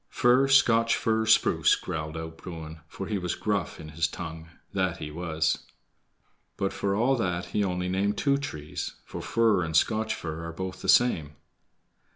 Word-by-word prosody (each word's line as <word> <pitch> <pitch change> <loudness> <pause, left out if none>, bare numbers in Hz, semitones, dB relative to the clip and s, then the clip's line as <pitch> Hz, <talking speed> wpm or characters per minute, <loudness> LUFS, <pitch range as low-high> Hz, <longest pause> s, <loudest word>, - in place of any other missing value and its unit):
"FIR, 125 +3 +4
SCOTCH 115 -4 +5
FIR, 110 0 +1
SPRUCE," 110 - +4
growled 80 0 -5
out 80 0 -6
Bruin, 80 -3 -8
for 95 - -6
he 100 0 -2
was 90 -1 -2
gruff 100 -3 -2
in 75 - -9
his 80 +2 0
tongue, 80 0 -7 0.2
that 95 -3 0
he 75 - -6
was. 80 -1 -1 1.0
But 95 - -1
for 100 -1 -1
all 125 +6 +3
that 90 -5 -1
he 105 - +2
only 90 -1 -1
named 100 +3 0
two 140 -1 +2
trees, 75 - -5
for - - -7
fir 110 -5 +2
and 80 0 +1
Scotch 110 +3 +1
fir 80 0 -5
are 85 - -6
both 95 +2 -5
the - - -3
same. 80 -12 +3
90 Hz, 175 wpm, -27 LUFS, 80-110 Hz, 1.0 s, SCOTCH